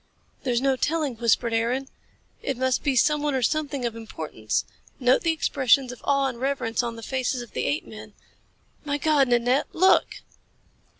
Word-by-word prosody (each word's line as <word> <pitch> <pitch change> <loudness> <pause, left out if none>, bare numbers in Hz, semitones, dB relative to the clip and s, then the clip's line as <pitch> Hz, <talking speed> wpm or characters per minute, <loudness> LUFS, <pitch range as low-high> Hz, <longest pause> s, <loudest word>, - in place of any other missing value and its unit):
"There's 245 -2 0
no 270 0 +2
telling," 290 -2 -1
whispered 235 0 +1
Aaron. 240 +4 0 0.5
"It 270 - -3
must 260 0 +1
be 280 -3 0
someone 295 +2 +2
or 260 - 0
something 285 -2 -1
of 230 -1 -2
importance. 155 - -4 0.3
Note 250 0 +3
the 330 - +2
expressions 270 -4 +2
of 250 - -11
awe 275 -1 +2
and 250 -3 -4
reverence 265 -5 0
on 235 -1 -4
the 230 - -10
faces 255 -1 -2
of 235 - -14
the - - -2
apemen. 215 -8 -4 0.7
My 290 -1 -1
God, 290 -2 +3
Nanette, 245 +3 +2
look!" 375 +3 +3
260 Hz, 165 wpm, -25 LUFS, 235-280 Hz, 0.7 s, Note